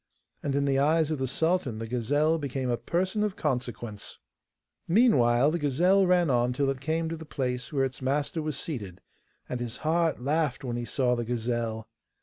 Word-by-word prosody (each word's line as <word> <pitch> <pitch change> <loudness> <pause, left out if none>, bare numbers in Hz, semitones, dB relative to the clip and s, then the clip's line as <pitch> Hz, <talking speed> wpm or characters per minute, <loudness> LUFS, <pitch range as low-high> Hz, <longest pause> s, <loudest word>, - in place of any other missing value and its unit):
And 140 -1 -2
in 140 0 +1
the 135 -1 +2
eyes 155 +2 +3
of 155 - -2
the 130 - -1
sultan 160 -4 0
the 115 - -4
gazelle 145 +8 +1
became 135 -3 -2
a - - +2
person 185 - -1
of 210 -2 0
consequence. 120 -6 -4 0.7
Meanwhile 145 - +4
the 170 - -1
gazelle 180 +7 +3
ran 175 -4 +3
on 120 0 +2
till 135 +1 +1
it 135 -1 -6
came 160 +3 -1
to 165 - -3
the 160 - -9
place 125 -5 -3
where 135 -3 +1
its 130 0 -6
master 145 +4 -1
was 155 -2 -3
seated, 100 - -5 0.5
and 125 - -3
his 120 -1 -5
heart 165 0 +2
laughed 145 +1 0
when 120 -2 -3
he 120 0 -3
saw 125 0 +1
the 120 - -2
gazelle. 115 -2 -2
135 Hz, 190 wpm, -28 LUFS, 125-160 Hz, 0.7 s, Meanwhile